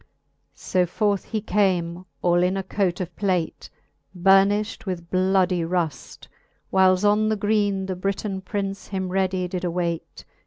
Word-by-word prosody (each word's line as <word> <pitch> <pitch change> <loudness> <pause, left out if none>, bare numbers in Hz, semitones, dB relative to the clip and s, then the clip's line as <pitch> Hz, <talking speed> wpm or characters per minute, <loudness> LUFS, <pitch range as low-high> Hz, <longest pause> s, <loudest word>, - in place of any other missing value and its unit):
XXIX. - - -31 0.5
So 180 -1 +1
forth 200 +2 0
he 220 -2 -3
came 185 -4 0 0.2
all 175 0 +3
in 185 +2 +1
a 195 - -2
cote 190 -2 -1
of 175 -2 -6
plate, 185 -5 -1 0.5
Burnifht 195 +4 +3
with 170 -2 -5
bloudie 185 -1 +2
ruft, 165 -3 -3 0.4
whiles 190 +1 +4
on 210 +1 +3
the 220 - +1
greene 205 -2 +1
The 190 -1 -3
Briton 195 +1 -3
Prince 195 0 -4
him 190 -2 -3
readie 185 -1 0
did 180 0 -4
awayte. 170 -2 -3
190 Hz, 150 wpm, -24 LUFS, 180-200 Hz, 0.5 s, whiles